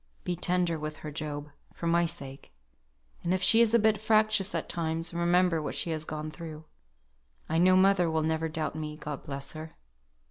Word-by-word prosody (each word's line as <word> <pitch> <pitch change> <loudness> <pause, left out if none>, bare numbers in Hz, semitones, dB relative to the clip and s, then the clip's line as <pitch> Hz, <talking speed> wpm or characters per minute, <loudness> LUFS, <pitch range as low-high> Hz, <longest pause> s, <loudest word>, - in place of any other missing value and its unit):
Be 180 - -1
tender 175 -1 0
with 155 0 -5
her, 150 - -4
Job, 150 -1 -5 0.2
for - - -6
my 170 0 +3
sake; 140 - -9 0.7
and 175 +2 +1
if 185 - -2
she 225 - +6
is 230 0 +4
a - - +8
bit 215 -2 +2
fractious 215 -2 +3
at - - -2
times, 165 0 -2
remember 175 -1 +2
what 150 - -4
she 170 - -1
has 155 -1 -3
gone 155 0 -5
through. 160 -1 -9 0.8
I 160 +1 +1
know 185 +1 +6
mother 185 -2 +4
will 160 -1 0
never 160 +1 0
doubt 155 -2 -3
me, 155 -1 -5
God 150 -2 -6
bless 140 -2 -6
her. 155 0 -8
165 Hz, 190 wpm, -29 LUFS, 155-180 Hz, 0.8 s, a